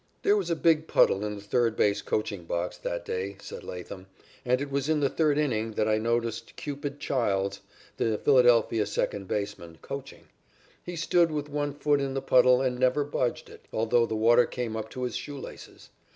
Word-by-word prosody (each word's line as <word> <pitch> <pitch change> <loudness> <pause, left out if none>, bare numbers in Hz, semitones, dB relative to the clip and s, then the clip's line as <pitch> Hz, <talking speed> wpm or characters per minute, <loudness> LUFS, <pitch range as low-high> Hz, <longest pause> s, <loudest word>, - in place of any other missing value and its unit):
"There 405 +1 +4
was 410 - -1
a 170 - +1
big 160 -1 +2
puddle 95 - +3
in 105 0 -3
the 100 - -9
third 115 +2 +1
base 100 -1 +2
coaching 100 -5 -2
box 85 +1 -2
that 85 0 -4
day," 95 +2 -4
said - - -9
Latham. 95 +1 -8 0.4
"And 125 +1 +2
it 140 0 -5
was 140 +1 -1
in 155 -1 +2
the 140 -2 +1
third 150 -3 +2
inning 115 -7 0
that 105 - 0
I 110 0 +2
noticed 115 0 -2
Cupid 145 0 -5
Childs, 100 -8 -1 0.4
the 110 -2 0
Philadelphia 120 -5 +4
second 100 -2 -2
baseman, 100 -5 -4
coaching. 140 0 -7 0.6
He 175 - -6
stood 170 +1 +3
with 150 -1 -3
one 145 -1 -2
foot 145 0 +1
in 135 -1 -2
the 135 - -1
puddle 125 0 +5
and 125 -1 -1
never 130 +3 +3
budged 130 -4 -2
it, - - -15
although 115 +1 +2
the 110 - -3
water 120 +3 +5
came 120 -3 -4
up 110 0 -4
to 130 - -6
his 125 -2 -3
shoe 145 -1 -5
laces. - - -11
120 Hz, 195 wpm, -27 LUFS, 105-145 Hz, 0.6 s, puddle